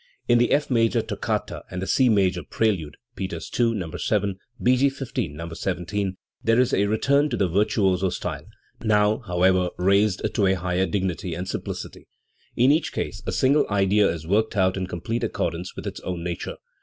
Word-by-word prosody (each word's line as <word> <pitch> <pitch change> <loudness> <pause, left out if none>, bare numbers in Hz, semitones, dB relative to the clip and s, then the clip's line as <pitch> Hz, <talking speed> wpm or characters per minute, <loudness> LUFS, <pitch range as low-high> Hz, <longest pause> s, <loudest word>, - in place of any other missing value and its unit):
In 120 - +5
the 120 - +3
F 145 -1 +1
major 115 -2 +2
toccata - - -3
and 90 - -5
the 95 - -3
C 130 +5 +3
major 95 -4 +2
prelude 90 -7 -1 0.2
(Peters 95 0 -5
II, 115 -1 +3
No. 90 -6 -4
7; 100 -3 0 0.2
B. 125 +1 +4
G. 140 +2 +3
XV, 135 -2 -8
No. 80 +3 -7
17), 95 +4 -2 0.3
there 115 +2 +3
is 125 - +2
a 100 +1 +3
return 140 +8 +2
to - - -2
the 95 - +2
virtuoso 95 0 +2
style, - - -5 0.4
now, 105 -1 +3
however, 90 0 +3
raised 100 +2 +2
to 100 - +2
a 95 - +4
higher 90 +1 0
dignity 90 -3 -2
and 90 +2 -5
simplicity. - - -6 0.5
In 125 +4 +5
each 155 +3 +1
case - - -4
a - - 0
single 140 +3 +3
idea 100 0 +3
is 80 -1 -4
worked 105 +5 +1
out 95 -1 +3
in 95 -1 -3
complete 90 +7 -3
accordance 85 +2 -3
with - - -7
its - - -5
own 90 -2 -5
nature. 85 -1 -4
100 Hz, 185 wpm, -24 LUFS, 90-115 Hz, 0.5 s, In